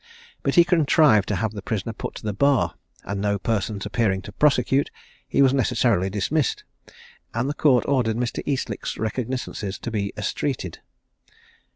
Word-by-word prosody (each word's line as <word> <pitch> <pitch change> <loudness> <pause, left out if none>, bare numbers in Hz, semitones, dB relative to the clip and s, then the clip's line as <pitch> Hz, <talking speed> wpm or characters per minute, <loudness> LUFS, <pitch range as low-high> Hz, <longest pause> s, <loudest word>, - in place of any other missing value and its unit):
But - - 0
he 175 - +8
contrived 155 - +4
to 105 - 0
have 110 +4 -1
the 105 -2 -7
prisoner 110 +2 -3
put - - -6
to - - -9
the 105 -1 -2
bar; 140 +5 +2 0.3
and 100 0 -4
no 100 0 +1
persons 105 -2 -2
appearing 105 -3 0
to - - -9
prosecute, 140 +2 +2 0.4
he 140 - +3
was 130 -1 +4
necessarily 120 -7 +2
dismissed; 120 +8 0 0.7
and 120 +2 0
the 145 - -1
court 135 -5 +3
ordered 120 -5 +1
Mr. 120 -1 -2
Eastlick's 130 -6 -2
recognisances 110 -3 -3
to 120 - -6
be 100 -2 -2
estreated. 105 - -3
115 Hz, 160 wpm, -24 LUFS, 105-135 Hz, 0.7 s, he